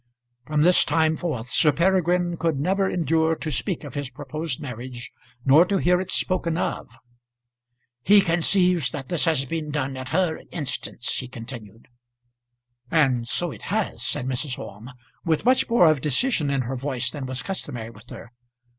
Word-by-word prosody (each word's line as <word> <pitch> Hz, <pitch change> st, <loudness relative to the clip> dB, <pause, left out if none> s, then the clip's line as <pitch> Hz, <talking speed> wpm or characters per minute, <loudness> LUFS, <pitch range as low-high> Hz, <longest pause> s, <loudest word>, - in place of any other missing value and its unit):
From 150 Hz, -1 st, +2 dB
this 180 Hz, +2 st, +6 dB
time 160 Hz, -1 st, +2 dB
forth 125 Hz, -9 st, -4 dB
Sir 150 Hz, -, +4 dB
Peregrine 175 Hz, 0 st, +2 dB
could 160 Hz, -4 st, -1 dB
never 190 Hz, +5 st, +1 dB
endure 160 Hz, -1 st, +1 dB
to 155 Hz, -1 st, -5 dB
speak 165 Hz, -, -2 dB
of 145 Hz, -4 st, -8 dB
his 145 Hz, -2 st, -4 dB
proposed 150 Hz, 0 st, -4 dB
marriage, 125 Hz, -1 st, -7 dB, 0.3 s
nor 145 Hz, +5 st, +7 dB
to 195 Hz, +2 st, 0 dB
hear 180 Hz, 0 st, +3 dB
it 185 Hz, -, -6 dB
spoken 170 Hz, -4 st, 0 dB
of. -, -, -2 dB, 1.1 s
"He 205 Hz, +10 st, +6 dB
conceives 180 Hz, 0 st, +2 dB
that 135 Hz, -4 st, -7 dB
this 175 Hz, -2 st, +1 dB
has 155 Hz, -5 st, +1 dB
been 155 Hz, +2 st, -4 dB
done 140 Hz, -2 st, -2 dB
at 130 Hz, -1 st, -6 dB
her 165 Hz, 0 st, 0 dB
instance," 140 Hz, -6 st, -3 dB
he 130 Hz, -, -4 dB
continued. 115 Hz, -3 st, -10 dB, 1.0 s
"And 130 Hz, -7 st, +2 dB
so 175 Hz, +7 st, -1 dB
it -, -, -11 dB
has," 210 Hz, +1 st, -1 dB
said 140 Hz, -4 st, -2 dB
Mrs. 130 Hz, 0 st, -2 dB
Orme, 105 Hz, +5 st, -9 dB, 0.3 s
with 160 Hz, +3 st, 0 dB
much 255 Hz, +1 st, +3 dB
more 230 Hz, -6 st, +5 dB
of 155 Hz, -4 st, +3 dB
decision 155 Hz, -, +1 dB
in 140 Hz, -1 st, +1 dB
her 130 Hz, +2 st, -4 dB
voice 130 Hz, -1 st, -2 dB
than 140 Hz, -3 st, -6 dB
was 130 Hz, 0 st, -3 dB
customary 125 Hz, -12 st, -5 dB
with 110 Hz, +2 st, -17 dB
her. 115 Hz, -, -10 dB
150 Hz, 170 wpm, -24 LUFS, 130-175 Hz, 1.1 s, nor